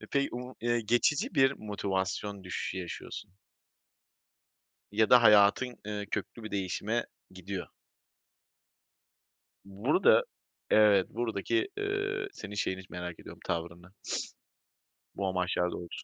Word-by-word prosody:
Eee, - - -10
pey 140 0 +2
u 125 +1 -6
eee, 120 0 +1
geçici 120 +6 +2
bir 135 -1 +5
motivasyon 100 -1 -3
düşüşü 90 +1 -3
yaşıyorsun. 90 +1 -7 1.6
Ya 110 +1 +2
da 125 -1 +8
hayatın, 105 +4 +5
eee, 105 -1 -3
köklü 110 +2 -4
bir 110 - -6
değişime 100 +4 -1 0.2
gidiyor. 95 0 -6 2.0
Burada 110 - +3 0.5
Evet. 105 -3 +6
Buradaki, 120 - -1
eee, 400 -1 -1
senin 105 0 -8
şeyini 95 -2 -1
z 95 - -20
merak 90 -1 -6
ediyorum, - - -11
tavrını. 85 +2 -4 1.2
Bu 100 - -1
amaçlar 90 -1 0
doğrultusu 85 -1 -7
105 Hz, 110 wpm, -30 LUFS, 95-120 Hz, 2.0 s, da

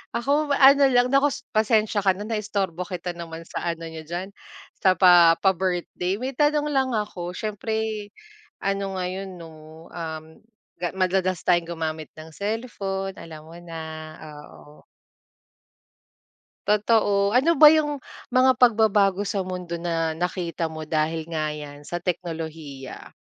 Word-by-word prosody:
ako 285 +6 +1
ano 275 +1 +7
lang 250 -1 +3
naku 275 +1 +4 0.2
pasensiya 215 -1 +2
ka 190 -1 +3
na 200 - -6
naistorbo 200 -5 -2
kita 180 -2 -4
naman 165 -1 -8
sa 170 - -5
ano 165 0 -3
n'yo 160 0 -7
diyan, 180 +4 -5 0.5
sa 185 -1 +4
pa 175 -3 +7
pa-birthday 185 -1 0
may 260 +3 -3
tanong 295 +2 +1
lang 265 -3 +1
ako 180 -4 -4
siyempre 215 0 -3 0.5
ano 195 -1 -2
ngayon 185 +1 -4
'no, 165 -1 -10 0.4
um, 160 -2 -6 0.6
ga 175 - 0
madalas 185 -1 0
tayong 175 -1 +2
gumamit 155 -1 -4
ng 155 0 -11
cellphone 200 -3 -3
alam 155 -3 -11
mo 165 - -13
na, 165 -1 -7 0.7
oo. 150 +1 -16 1.9
Totoo 205 -1 +3
ano 310 +7 +3
ba 305 0 +9
yung 295 -2 +1 0.3
mga 255 +1 +5
pagbabago 210 -5 +3
sa 195 0 -1
mundo 180 -2 -5
na 165 -2 -1
nakita 170 -1 -2
mo 155 0 -7
dahil 155 +1 -1
nga 155 -2 -2
yan 145 -1 -8
sa 175 +4 -5
teknolohiya? 160 -6 -6
185 Hz, 135 wpm, -24 LUFS, 165-215 Hz, 1.9 s, ba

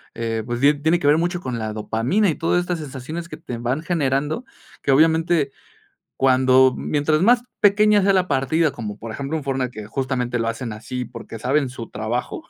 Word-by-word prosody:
eh, 115 -1 -2
pues 120 0 -3
die 145 +2 +6
tiene 160 +4 +1
que - - -5
ver 150 +1 +5
mucho 175 +1 -1
con 125 -5 -4
la 110 -1 -3
dopamina 115 - 0
y - - +1
todas 165 +2 +1
estas 180 -1 -3
sensaciones 155 +4 -6
que 155 - -8
te 155 -7 -7
van 125 +6 -2
generando, 150 - -1 0.4
que - - +1
obviamente 160 0 +3 0.7
cuando 130 0 +4
mientras 155 +1 0
más 240 +5 +4 0.2
pequeña 210 +1 +5
sea 195 +1 +3
la 185 -1 +2
partida, 145 +3 +1
como 105 -5 -6
por 115 +1 -7
ejemplo, 140 +7 -3
en 155 - -6
Fortnite, 135 -2 -1
que 110 -3 -8
justamente 125 0 -2
lo 115 - -1
hacen 115 0 -4
así 120 +4 -5
porque, 115 - -9
saben 135 +4 0
su 120 -2 -8
trabajo. 120 - -3
135 Hz, 195 wpm, -22 LUFS, 120-165 Hz, 0.7 s, die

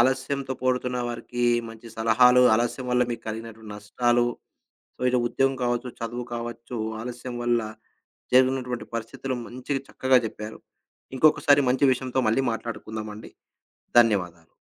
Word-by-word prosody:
ఆలస్యంతో 130 +2 +1
పోడుతున్న 125 -1 0
వారికి 120 +1 -3 0.2
మంచి 115 +1 -12
సలహాలు, 125 +3 +5
ఆలస్యం 120 +3 -1
వల్ల 125 0 +3
మీకు 120 - -4
కలిగినటువంటి 110 -1 -7
నష్టాలు. 120 +4 +1 0.7
సో, - - -23
ఇలా 125 -1 +2
ఉద్యోగం 135 +2 +1
కావచ్చు, 120 +1 -1
చదువు 120 +1 -4
కావచ్చు, 120 0 -6 0.2
ఆలస్యం 120 0 -6
వల్ల 120 -1 +2 0.7
జరిగినటువంటి 130 -1 +2
పరిస్థితులు 130 +3 -4
మంచిగా 130 +3 -4
చక్కగా 130 -1 +3
చెప్పారు. 105 0 -7 0.6
ఇంకొకసారి 145 0 +5
మంచి 130 +2 +2
విషయంతో 130 0 -3
మళ్ళీ 115 +5 +3
మాట్లాడుకుందామండి. 110 -1 -6 0.7
ధన్యవాదాలు. 90 -8 0
120 Hz, 120 wpm, -25 LUFS, 115-130 Hz, 0.7 s, సలహాలు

